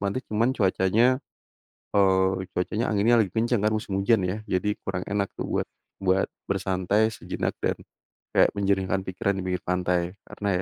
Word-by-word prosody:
pantai, 100 +6 -1
cuman 115 +4 +3
cuacanya, 110 +6 +3 0.8
eee, 95 -1 +3
cuacanya, 105 +5 -1
anginnya 115 +4 +4
lagi 100 -5 +1
kencang 115 -1 +1
kan 110 - +2
musim 100 -3 -2
hujan 100 0 +3
ya. 90 +3 -1
Jadi 105 +3 0
kurang 90 -2 -2
enak 100 -1 +1
tuh - - -4
buat - - 0 0.3
buat 95 0 +1 0.2
bersantai 100 +3 +1
sejenak - - -4
dan - - 0 0.6
kayak - - +5
menjernihkan 95 -1 0
pikiran 95 +1 -1
di 95 - -3
pinggir 90 -1 -1
pantai. 90 0 0 0.2
Karena 100 - -6
95 Hz, 160 wpm, -26 LUFS, 95-105 Hz, 0.8 s, kayak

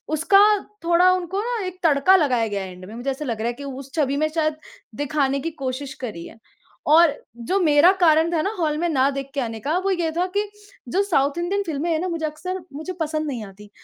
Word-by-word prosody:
उसका 330 +6 +4 0.4
थोड़ा 345 +2 +5
उनको 370 +2 -2
ना 480 0 -2
एक 365 0 -7
तड़का 325 +3 +5
लगाया 255 -9 +2
गया 200 -2 -3
है 185 - -7
एंड 180 0 -12
में 215 - -10
मुझे 245 +4 -3
ऐसा 270 +3 -5
लग 230 -4 -3
रहा 230 - 0
है - - -1
कि 280 - -9
उस 270 0 -8
छवि 280 -4 +1
में 310 +2 +1
शायद 310 -1 -1 0.4
दिखाने 280 -1 0
की 330 - -3
कोशिश 265 +1 -4
करी 170 -8 -6
है। - - -13 0.5
और 315 0 +6 0.3
जो 385 - +1
मेरा 315 +2 +6
कारण 325 0 +4
था 320 -2 +1
ना 395 - -1
हॉल 310 -3 0
में 345 +2 0
न 275 -3 +2
देख 275 0 -5
के 280 - 0
आने 225 -3 -4
का 305 +9 0
वो 390 - +1
ये 345 -4 0
था 355 +1 +1
कि 415 0 0 0.4
जो 380 +11 +1
साउथ 295 -6 +1
इंडियन 385 +4 -1
फ़िल्में 320 +1 -2
हैं 315 - +1
ना 370 - -2
मुझे 330 -2 -2
अक्सर 365 +5 -5
मुझे 315 +6 -5
पसंद 310 0 -1
नहीं 250 -7 -4
आती 205 +1 -14
305 Hz, 240 wpm, -22 LUFS, 270-345 Hz, 0.5 s, और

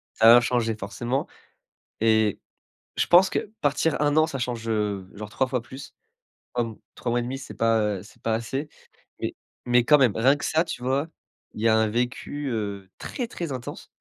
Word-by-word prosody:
Ça 115 +1 +8
va 120 - +8
changer 120 -2 0
forcément 120 +6 -3 0.7
et 110 -2 +3 0.6
je - - +1
pense 185 +2 +7
que, - - 0 0.2
partir 145 +3 +1
1 150 0 +2
an, 155 0 +5
ça 135 - -4
change, 120 -2 -3
heu, 105 -4 -1
genre 105 0 -7
3 130 +3 +1
fois 125 -2 -1
plus. 130 +3 -10 0.6
Comme 115 -3 -2 0.2
3 120 - -3
mois 120 +1 +1
1/2 130 +3 -4
c'est 135 - -9
pas, 115 0 +2 0.2
heu, - - -9
c'est 100 - -18
pas 115 -1 +1
assez. 135 +6 -3 0.5
Mais - - -3 0.3
mais 120 0 +4
quand 150 +4 +6
même, 125 -7 +3
rien 130 +5 +4
que 145 - -5
ça, 160 +2 +2
tu 160 -7 -6
vois? 135 +4 0 0.5
Il - - -6
y 115 - +3
a 110 - +5
un 110 0 +3
vécu, 125 +5 -2
heu, 100 -3 -3
très 245 -4 -4
très 170 -9 -5
intense 125 -2 -6
120 Hz, 195 wpm, -25 LUFS, 110-135 Hz, 0.7 s, Ça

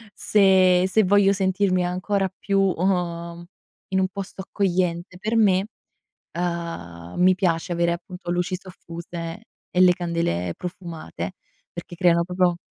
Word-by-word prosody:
se 185 -3 +4
se 220 +2 +4
voglio 200 +1 +4
sentirmi 190 -1 +1
ancora 190 +2 -1
più, 195 -1 +1
uhm, 175 -2 -1 0.4
in 190 0 +1
un 185 - +2
posto 195 0 -7
accogliente 180 -2 -1
per 215 +3 -1
me, 195 -2 +3 0.7
uhm, 165 - -4
mi 185 +1 +5
piace 175 -2 0
avere 170 0 +1
appunto 180 +1 -7
luci 180 +1 -1
soffuse 170 +1 -8 0.3
e 180 - 0
le 180 -1 +7
candele 170 - -2
profumate 180 0 -6 0.4
perché 175 0 -8
creano 170 -1 +3
proprio 180 -1 +1
180 Hz, 125 wpm, -23 LUFS, 170-190 Hz, 0.7 s, le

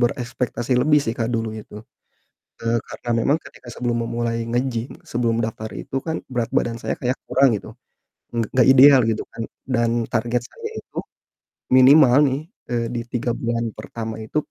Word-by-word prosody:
berekspektasi 120 0 -1
lebih 150 +3 +4
sih 115 - -1
Kak, 115 0 0
dulu 115 -1 -1
itu. 105 - -15 0.9
Eee, 115 0 +1
karena 120 - -7
memang 145 - +3
ketika - - -15
sebelum 120 -1 -1
memulai 115 0 -2
nge-gym, 120 0 -1 0.2
sebelum 115 -1 +1
daftar 110 0 -4
itu 135 - -6
kan 160 0 -1 0.2
berat 120 -2 -1
badan 115 -1 +1
saya - - -2
kayak 125 +1 -1
kurang 135 0 +4
gitu, - - -12 0.6
ng 115 - 0
nggak 125 -2 +4
ideal 135 +1 +8
gitu 110 -1 0
kan, 115 0 -6 0.3
dan 120 -2 +2 0.2
target 120 +1 0
saya 450 -1 -7
itu - - -18 0.8
minimal 130 0 +7 0.2
nih, 135 +1 -1 0.3
eee, 120 -1 0
di 120 - -2
3 120 -1 -1
bulan 115 0 -2
pertama 110 0 -6
itu 110 +7 -4
120 Hz, 165 wpm, -22 LUFS, 115-130 Hz, 0.9 s, ideal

